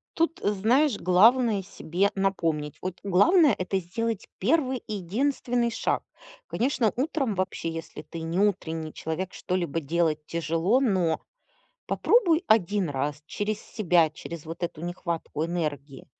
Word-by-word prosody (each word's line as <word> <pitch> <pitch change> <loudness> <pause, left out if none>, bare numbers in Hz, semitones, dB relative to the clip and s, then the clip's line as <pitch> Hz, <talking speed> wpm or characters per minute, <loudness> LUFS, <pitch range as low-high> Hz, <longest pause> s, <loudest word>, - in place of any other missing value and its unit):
Тут, 330 0 0
знаешь, 220 +6 +2
главное- 215 +4 +4
себе 185 +1 -1
напомнить, 165 -7 -1
вот 185 0 -5
главное- 265 - +5
это 185 +1 -1
сделать 220 +4 -3
первый 260 - +1
единственный 235 +4 0
шаг. - - -1 0.4
Конечно, 240 -3 +1
утром 270 -4 -1
вообще, 185 -2 -2
если 165 0 -7
ты 165 - -8
не 165 +3 -2
утренний 165 -6 0
человек, 170 +4 -4
что-либо 175 -3 -2
делать 155 0 0
тяжело, 165 - +1
но 185 -10 +1 0.7
попробуй 360 -8 +3
1 205 -3 +3
раз 145 +1 -3
через 210 +4 -3
себя, 175 -6 +2
через 165 +1 -8
вот 165 +2 -7
эту 170 -2 -3
нехватку 170 -2 -3
энергии 150 -5 -4
185 Hz, 125 wpm, -26 LUFS, 165-230 Hz, 0.7 s, главное